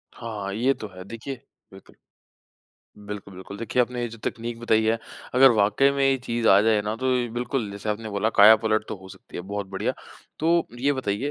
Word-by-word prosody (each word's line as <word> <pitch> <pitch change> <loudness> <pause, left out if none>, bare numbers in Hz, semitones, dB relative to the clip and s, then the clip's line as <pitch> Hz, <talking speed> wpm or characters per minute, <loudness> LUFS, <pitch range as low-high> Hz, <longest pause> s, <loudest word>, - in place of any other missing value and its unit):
हाँ, 105 -4 -5
ये 125 +6 +2
तो 110 -4 -8
है। 90 - -8
देखिए 115 +5 -6 0.4
बिल्कुल। - - -16 1.1
बिल्कुल, 100 -2 -7
बिल्कुल 95 +2 -9
देखिए 115 +2 0
आपने 125 0 -4
ये 120 - -2
जो 115 0 -11
तकनीक 115 0 -4
बताई 110 -2 +2
है 115 +1 +2 0.4
अगर 135 +1 +8
वाक़ई 105 +6 +3
में 140 0 -1
ये 135 0 +3
चीज़ 115 -1 0
आ 95 +1 +7
जाए 110 -1 +3
ना 105 +1 -2
तो 130 - -3 0.3
बिल्कुल 120 -3 -2
जैसे 100 +1 -7
आपने 110 +1 -2
बोला 100 +2 0
काया 110 +2 +9
पलट 110 0 +1
तो - - -3
हो 95 0 -14
सकती - - -12
है, 90 - -4
बहुत 100 +1 -5
बढ़िया। 95 0 -2 0.5
तो 170 +2 +2
ये 140 +2 +2
बताइए 130 +1 -2
110 Hz, 205 wpm, -25 LUFS, 100-125 Hz, 1.1 s, काया